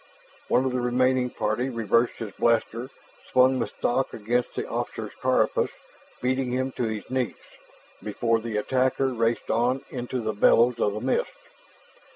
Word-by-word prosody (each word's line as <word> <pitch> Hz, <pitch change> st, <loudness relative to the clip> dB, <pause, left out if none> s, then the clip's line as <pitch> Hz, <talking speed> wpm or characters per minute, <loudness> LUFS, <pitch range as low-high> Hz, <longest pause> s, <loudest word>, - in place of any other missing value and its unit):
One 130 Hz, -, +3 dB
of 130 Hz, -, 0 dB
the 125 Hz, 0 st, -1 dB
remaining 125 Hz, +1 st, +2 dB
party 120 Hz, +3 st, -1 dB
reversed 115 Hz, 0 st, +1 dB
his 110 Hz, -3 st, -6 dB
blaster, 115 Hz, +2 st, 0 dB, 0.4 s
swung 130 Hz, +1 st, +4 dB
the -, -, 0 dB
stock 130 Hz, +2 st, -1 dB
against 120 Hz, +3 st, -1 dB
the -, -, -3 dB
officer's -, -, -4 dB
carapace, -, -, +2 dB, 0.5 s
beating 130 Hz, 0 st, +1 dB
him 130 Hz, +2 st, -1 dB
to 125 Hz, -, -2 dB
his 110 Hz, -2 st, -4 dB
knees, 130 Hz, -3 st, -1 dB, 0.7 s
before 115 Hz, +2 st, 0 dB
the 110 Hz, -1 st, -3 dB
attacker 130 Hz, +4 st, +1 dB
raced 115 Hz, -2 st, 0 dB
on 125 Hz, +3 st, +1 dB
into 125 Hz, 0 st, -3 dB
the 110 Hz, -2 st, -2 dB
billows 115 Hz, +3 st, +4 dB
of 105 Hz, -, +1 dB
the 105 Hz, -, -4 dB
mist. -, -, 0 dB
125 Hz, 155 wpm, -26 LUFS, 115-130 Hz, 0.7 s, swung